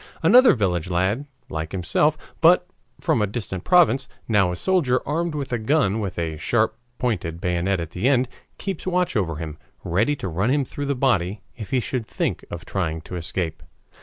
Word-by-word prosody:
Another 255 +1 +7
village 90 -6 0
lad 95 +10 0 0.2
like 80 +1 -5
himself, 145 - +2 0.2
but 180 +2 +6 0.3
from 115 - +1
a 105 - +2
distant 100 -4 -4
province, 165 -7 +4 0.2
now 100 -5 +3
a - - -3
soldier 135 - +1
armed 165 +2 -1
with 140 -4 -3
a 120 - 0
gun 110 -4 +2
with 100 -4 -4
a 80 -2 -2
sharp 110 +6 +1 0.2
pointed 90 -9 -2
bayonet 90 +2 0
at 85 -1 -5
the 95 +9 0
end, 130 -2 +3 0.3
keeps 190 -2 -5
watch 180 -3 +1
over 90 -7 0
him, 80 0 -6 0.2
ready 105 +12 +1
to 100 - -5
run 95 +7 0
him 140 0 +2
through 145 +3 -5
the 140 - 0
body 105 -7 +1
if 105 - -8
he 130 -1 +2
should 120 -1 -3
think - - -2
of - - -7
trying 80 -4 -2
to 90 - -8
escape. 85 -2 -3
105 Hz, 190 wpm, -23 LUFS, 90-140 Hz, 0.3 s, Another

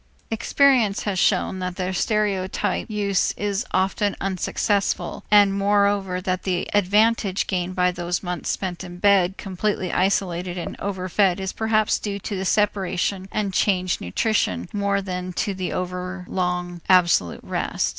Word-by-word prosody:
Experience 230 -2 +3
has 195 -3 -1
shown 185 - +1
that 180 -1 -3
their 185 0 -2
stereotyped 200 +1 -1
use 200 -3 0
is 205 +2 -2
often 195 +2 0
unsuccessful, 195 +2 -1
and 205 -1 +6
moreover 200 -2 +1
that 185 0 -2
the 180 -2 -1
advantage 205 0 +2
gained 185 -1 -2
by 180 -1 +3
those 175 +1 -3
months 180 -1 -4
spent 185 -2 -3
in 175 -1 -9
bed 195 -1 +3
completely 190 -1 -2
isolated 180 -2 0
and 175 - -5
overfed 190 -1 0
is 190 0 -3
perhaps 220 -1 +1
due 200 -2 -3
to 200 +1 -5
the 190 0 -3
separation 195 -1 0
and 200 -2 -1
changed 185 -3 +1
nutrition 90 - 0
more 200 -1 0
than 180 -1 -4
to 200 +3 -1
the 185 -1 -4
overlong 180 -1 -3
absolute 175 - +3
rest. - - -1
190 Hz, 140 wpm, -23 LUFS, 180-205 Hz, -, and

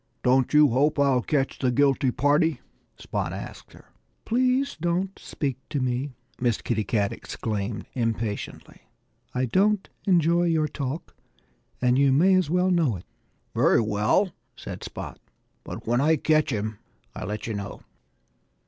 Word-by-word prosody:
"Don't 130 0 +3
you 150 -1 +6
hope 140 +6 +2
I'll 140 -3 +3
catch 135 +1 -1
the 130 - +2
guilty 135 +1 +3
party?" 145 +3 +2 0.4
Spot - - -3
asked - - -8
her. - - -18 0.3
"Please 255 +3 +1
don't 175 +4 -1
speak 135 -4 -3
to 150 -2 -1
me!" 130 +1 -2 0.2
Miss 120 -3 +1
Kitty 110 -3 -1
Cat 100 -1 0
exclaimed 105 -1 -4
impatiently. 115 -3 -4 0.5
"I 125 +1 +1
don't 195 - +2 0.2
enjoy 170 -1 +4
your 160 -2 +2
talk; 140 +2 -5 0.7
and 125 +1 +4
you 140 -1 +5
may 175 +8 +5
as 185 -5 +3
well 180 +2 +2
know 160 - +2
it." 90 - -9 0.5
"Very - - +4
well!" 110 - +2 0.2
said - - -8
Spot. - - -7 0.4
"But - - -8
when 120 +3 +2
I 160 +3 +4
catch 155 0 +2
him 110 -2 -3 0.4
I'll - - -5
let 105 0 -4
you 115 - -3
know." 100 -2 -6
140 Hz, 150 wpm, -25 LUFS, 115-165 Hz, 0.7 s, you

